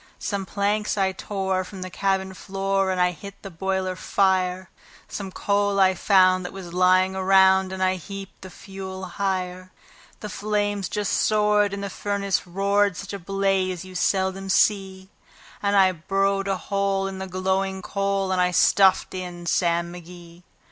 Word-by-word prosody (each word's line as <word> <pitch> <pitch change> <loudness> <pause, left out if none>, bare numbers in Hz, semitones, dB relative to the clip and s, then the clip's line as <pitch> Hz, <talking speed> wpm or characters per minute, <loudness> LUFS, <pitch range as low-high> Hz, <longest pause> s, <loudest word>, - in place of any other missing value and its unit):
Some 200 -2 -3
planks 210 +1 -1
I 190 -1 +2
tore 190 -1 -2
from 185 0 -8
the 185 - -8
cabin 190 0 -1
floor, 195 0 -1
and 185 -1 -1
I 180 -1 +2
lit 200 0 -8
the 195 - -8
boiler 190 +1 -2
fire; 185 -1 0 0.4
Some 195 -2 -6
coal 200 +1 0
I 190 -1 +5
found 185 -1 +4
that 180 - -6
was 180 -3 -9
lying 185 +1 +3
around, 190 0 +4
and 190 0 -2
I 185 0 +1
heaped 195 +2 -9
the 185 - -9
fuel 190 0 -8
higher; 185 -1 -3 0.5
The 210 - -5
flames 205 -1 -2
just 210 -2 -2
soared, 210 -1 +2
and 200 0 -5
the 200 - -3
furnace 200 -2 -2
roared 200 +1 +1
such 200 0 -7
a 200 - -5
blaze 190 -1 -1
you 185 - -11
seldom 190 +1 0
see; 190 -1 +1 0.5
And 205 0 +1
I 190 -1 +5
burrowed 195 +3 -1
a 195 -1 0
hole 195 0 -1
in 195 -1 -5
the 190 - -5
glowing 190 +1 -1
coal, 195 -1 -1
and 185 -1 +1
I 180 - +3
stuffed 190 +2 +4
in 180 -2 -6
Sam 170 0 0
McGee. 175 0 -12
190 Hz, 165 wpm, -24 LUFS, 185-200 Hz, 0.5 s, I